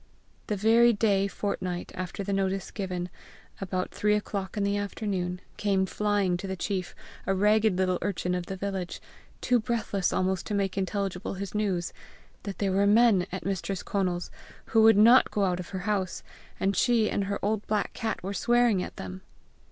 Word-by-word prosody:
The 210 - 0
very 230 +4 +5
day 200 -2 +2
fortnight 185 -3 -3
after 185 +2 -5
the 200 +1 -2
notice 195 -1 -1
given, 185 -3 -3 0.5
about 185 -1 -2
three 210 0 +2
o'clock 200 -1 -3
in 205 - +1
the 200 0 +1
afternoon, 195 -3 -3 0.2
came 195 -2 +1
flying 200 -2 0
to 195 +2 -6
the 190 - -3
chief 185 0 -3 0.3
a 195 - +2
ragged 210 0 +3
little 185 -1 +1
urchin 180 -2 -1
of 180 -1 -3
the 195 - -4
village, 190 -2 -4 0.4
too 245 -1 +3
breathless 215 -5 -1
almost 185 0 0
to 210 - -1
make 195 -2 0
intelligible 195 -1 -2
his 195 +1 -5
news 195 -5 -1 0.5
that 200 -2 -6
there 195 -2 0
were 200 +2 +3
men 210 -3 +5
at 185 - -5
Mistress 195 -1 -2
Conal's 180 -3 -1 0.4
who 225 - +6
would 225 -1 +7
not 235 +5 +7
go 205 -2 +1
out 180 -1 0
of 180 - -7
her 190 -2 -4
house, 200 -4 -1 0.4
and 195 +1 +1
she 235 0 +3
and 200 - -1
her 200 0 -2
old 215 0 -1
black 210 -1 0
cat 220 -4 -3
were 195 +2 -3
swearing 240 -3 +3
at - - -6
them. 95 0 -7
195 Hz, 185 wpm, -28 LUFS, 185-210 Hz, 0.5 s, would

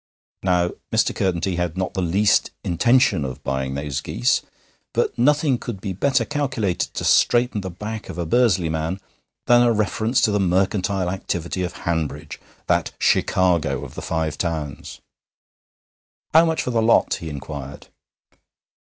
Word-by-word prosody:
Now, 90 -2 +1 0.2
Mr. - - +2
Curtenty 90 -1 -1
had 90 -1 -2
not 95 -2 -2
the 95 - -2
least 95 +4 +2
intention 105 - +3
of 65 -1 -6
buying 65 0 -2
those 70 -1 -3
geese, - - +1 0.5
but - - 0
nothing 145 0 +2
could 115 -5 -6
be 95 -1 -4
better 130 +5 +1
calculated 130 - -1
to - - -3
straighten 120 -3 +3
the 95 - -5
back 105 +5 -7
of - - -7
a 85 - -2
Bursley 95 -2 +2
man 80 +4 -2 0.5
than 120 0 +5
a 120 -1 +4
reference 110 +3 +1
to 110 - +3
the 105 - +1
mercantile 95 0 +1
activity 90 -1 -3
of 90 -2 -3
Hanbridge, 80 -3 -3 0.3
that - - 0
Chicago 85 -7 +1
of - - -11
the - - -7
Five 80 -2 -2
Towns. 80 -5 -4 1.3
'How 160 +2 +7
much 160 -1 0
for 125 - -2
the 115 -2 +1
lot?' 115 +1 +3
he 80 - -6
inquired. 70 -1 -7
95 Hz, 155 wpm, -22 LUFS, 80-115 Hz, 1.3 s, How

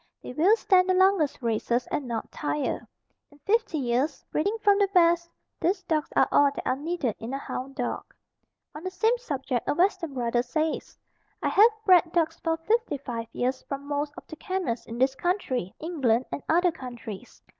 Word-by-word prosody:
They - - -7
will 355 - +5
stand 375 -4 +3
the 370 - +4
longest 375 -8 +3
races 235 +2 0
and 275 - -2
not 230 -2 -4
tire. 295 -1 -2 0.4
In 290 - -20
fifty 445 -5 +1
years 260 +2 -1
breeding 405 +8 0
from 405 0 +5
the 405 - +4
best, 340 -1 +4 0.3
these 370 +4 0
dogs 310 -2 -1
are - - +5
all 285 0 +5
that - - -6
are 255 - +2
needed 290 -5 -2
in 235 +4 -5
a - - -1
hound 270 0 -6
dog. 245 - -4 0.6
On 300 - -9
the 370 - -2
same 440 +6 +2
subject 270 - -3
a - - +1
Western 350 -4 +1
brother 240 -1 +1
says: 310 +6 -2 0.5
I - - +2
have 430 +4 +7 0.2
bred 355 -3 +5
dogs 325 -1 +1
for 325 -1 0
55 290 - -1
years 255 +1 -1
from 275 0 -4
most 290 0 -2
of - - -10
the 315 - -10
kennels 370 - -3
in 230 - -6
this 260 +2 +3
country, 270 - -1
England 265 -8 +1
and - - -4
other 350 +2 +4
countries. 240 -6 -9
300 Hz, 185 wpm, -27 LUFS, 255-360 Hz, 0.6 s, have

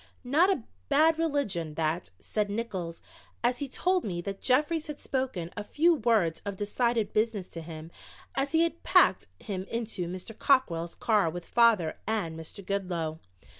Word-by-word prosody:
Not 300 +9 +4
a 330 - +1 0.3
bad 315 +3 +4
religion, 250 - -1
that," 160 +2 -1
said 210 -1 -1
Nickols, 200 -6 -4 0.4
as 245 +1 +2
he 285 - -3
told 365 +6 +1
me 175 -4 -3
that 195 +2 -6
Jeffries 300 +5 +2
had 300 -1 -6
spoken 255 -11 -2
a 205 - -4
few 330 +10 +3
words 220 - +2
of 200 -1 -4
decided 225 +2 0
business 215 -3 0
to 165 - -7
him 160 0 -9 0.4
as 275 +1 0
he 325 0 +4
had 335 0 -2
packed - - +4
him 190 -4 -4
into 225 -6 -3
Mr. 185 +5 -7
Cockrell's 175 -12 +2
car 210 -7 +2
with 175 +1 -6
father 225 -9 +3
and 205 -7 -1
Mr. 165 +4 -9
Goodloe. 175 -5 -2
210 Hz, 165 wpm, -29 LUFS, 175-265 Hz, 0.4 s, Not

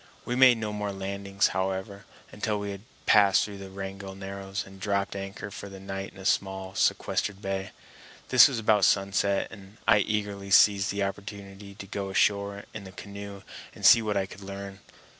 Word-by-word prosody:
We 120 - -2
made 130 -2 +7
no 110 -1 -3
more 105 -1 -3
landings, 100 0 -1
however, 95 +2 -3 0.3
until 105 0 -2
we 100 0 -4
had 100 -1 -7 0.2
passed 100 -2 +5
through 100 -2 -8
the 95 -1 -8
Wrangell 95 0 -7
Narrows 95 0 -5
and 95 0 -14
dropped 100 0 -1
anchor 100 +1 -6
for 100 - -8
the 95 0 -10
night 95 0 -6
in - - -14
a 95 - -10
small 95 -1 0
sequestered 100 +1 0
bay. 95 -1 -3 0.6
This 130 +1 +9
was 135 -4 -3
about 105 -2 +3
sunset, 100 +1 +2
and 100 0 -13
I 100 - +6
eagerly 100 -1 -2
seized 100 +1 +5
the 100 0 -1
opportunity 100 0 -7
to 100 - -9
go 100 -1 -4
ashore 100 +1 +1
in 110 - -7
the 95 - -10
canoe 100 0 -9 0.3
and - - -5
see 115 - +9
what 105 -2 -1
I 95 - +1
could 100 - -12
learn. 100 0 -8
100 Hz, 185 wpm, -27 LUFS, 95-100 Hz, 0.6 s, This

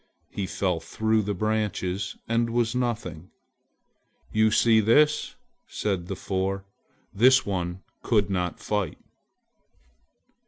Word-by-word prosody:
He 100 -2 -3
fell 90 -3 -1
through 110 +6 0
the 105 0 -2
branches 105 -2 -2
and 115 0 +1
was 115 0 +1
nothing! 115 -8 -3 1.0
"You 110 0 +4
see 110 +1 +4
this!" 150 +8 +3 0.3
said 95 -4 -2
the 95 - -4
four, 95 +1 -2 0.5
"this 130 +5 +5
one 90 -2 -3 0.2
could 105 -4 +2
not 90 -3 -2
fight." 105 -6 -2
105 Hz, 110 wpm, -26 LUFS, 95-115 Hz, 1.0 s, this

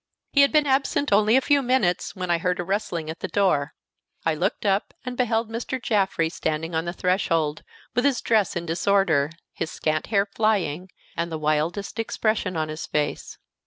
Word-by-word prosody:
He 280 - +5
had 280 - +5
been 305 -1 +4
absent 275 -2 +1
only 215 +4 +5
a - - +4
few 285 +1 +3
minutes 245 -10 +1
when 180 -2 -2
I 170 - +2
heard 180 +1 0
a - - 0
rustling 175 -4 -2
at 160 - -10
the - - -3
door. 160 -8 +1 0.5
I 165 - +3
looked 185 +8 -2
up, 200 0 +1
and 250 0 -4
beheld 230 -2 +1
Mr. 240 +3 -3
Jaffrey 195 -8 +1
standing 160 0 -3
on 160 +1 0
the 175 - -2
threshold, 165 -5 0 0.3
with 245 - +1
his 275 -3 +2
dress 215 -5 +1
in 170 -1 -3
disorder, 170 -4 +2 0.2
his - - -3
scant 155 -1 -1
hair 200 -2 +2
flying, 200 -5 0 0.3
and 170 0 -2
the 160 - -2
wildest 155 +8 -1
expression 215 -5 -1
on 155 0 0
his 155 +1 -6
face. 150 -1 -2
190 Hz, 190 wpm, -24 LUFS, 165-225 Hz, 0.5 s, He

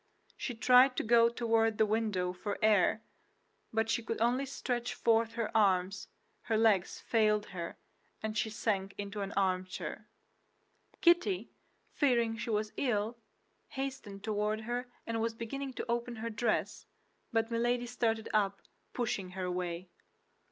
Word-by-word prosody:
She 245 - -4
tried 250 +3 +6
to - - +1
go 230 0 +5
toward 225 -2 +1
the 220 - +4
window 210 -4 0
for 200 +2 -4
air, 215 +1 +4 0.7
but 225 0 +1
she 235 - +1
could 225 0 -4
only 245 +4 +2
stretch 245 -2 -3
forth 230 -1 +2
her 230 -1 -3
arms; 195 -2 +2 0.4
her 225 - +1
legs 215 -5 +3
failed 215 -2 +2
her, 170 -2 -5 0.5
and 215 0 -2
she 220 - 0
sank 200 -3 -1
into 205 0 -4
an 195 0 -3
armchair. 185 -1 -2 0.9
Kitty, 235 - +3 0.4
fearing 235 -5 +2
she 230 - -5
was 215 -1 -1
ill, 230 -2 0 0.5
hastened 265 -8 -5
toward 215 0 -1
her 245 +3 -3 0.2
and 230 -1 -2
was 225 0 -1
beginning 265 +4 -5
to - - -4
open 235 +1 -1
her 230 +1 -4
dress; 225 0 -1 0.4
but 225 0 +1
Milady 240 +1 +1
started 225 -2 -1
up, 200 -2 +1 0.3
pushing 205 -6 -2
her 185 - -2
away. 180 0 -3
225 Hz, 145 wpm, -32 LUFS, 205-235 Hz, 0.9 s, tried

